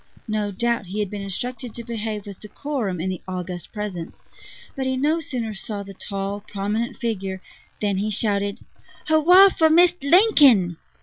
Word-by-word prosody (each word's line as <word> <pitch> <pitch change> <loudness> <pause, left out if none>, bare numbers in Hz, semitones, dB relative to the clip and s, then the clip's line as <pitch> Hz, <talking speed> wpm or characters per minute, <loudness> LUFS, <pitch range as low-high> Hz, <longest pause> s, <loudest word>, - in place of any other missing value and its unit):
No 215 -1 -1
doubt 235 +1 -1
he 200 +4 -4
had 205 -3 -2
been 205 -1 -5
instructed 245 +5 -5
to 235 - -6
behave 220 -3 -4
with 200 -2 -9
decorum 220 - -4
in 185 +3 -1
the 185 - -5
august 180 -2 -5
presence; 205 -6 -6 0.5
but 265 -1 -2
he 260 0 0
no 300 +5 +2
sooner 245 -8 -4
saw 205 0 -4
the 195 0 -10
tall, 195 +1 -4
prominent 210 +5 -2
figure 195 -6 -3 0.4
than 200 -2 0
he 205 +2 -1
shouted: 200 -1 0 0.5
"Hurrah 355 +5 +7
for 320 -4 +3
Mist' 350 +1 +4
Lincoln!" 280 - +5
215 Hz, 165 wpm, -23 LUFS, 195-260 Hz, 0.5 s, Hurrah